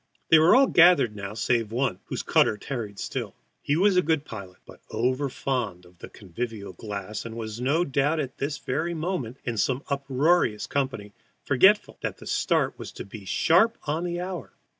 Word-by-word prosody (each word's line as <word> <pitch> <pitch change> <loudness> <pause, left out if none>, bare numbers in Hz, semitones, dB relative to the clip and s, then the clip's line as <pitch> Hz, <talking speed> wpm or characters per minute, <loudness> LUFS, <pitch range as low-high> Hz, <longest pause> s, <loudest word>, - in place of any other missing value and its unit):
They 160 - +8
were 160 +7 +6
all 270 +1 +7
gathered 170 - +5
now 100 0 -6
save 115 0 0
one, 120 -5 -1
whose - - -4
cutter 105 - +3
tarried 110 -4 -5
still. - - -5 0.3
He 145 - 0
was 190 +2 +3
a - - +6
good 160 -3 0
pilot, 95 -7 -9
but - - -15
overfond 125 -5 -2
of 90 0 -21
the - - -9
convivial 105 0 -6
glass, 105 +1 -6
and 115 -1 -7
was 110 0 -5
no 150 +7 +2
doubt 140 +3 +1 0.2
this 140 +2 -2
very 160 +6 -2
moment 155 -8 -3
in 120 -2 -3
some 130 +6 0
uproarious 140 -3 +1
company, 130 -7 -3 0.3
forgetful - - +3
that - - -3
the - - -13
start - - 0
was - - -7
to - - -8
be 100 0 -10
sharp 185 - +3
on 155 +3 -2
the 175 0 -3
hour. 180 -4 -6
130 Hz, 180 wpm, -26 LUFS, 105-160 Hz, 0.3 s, They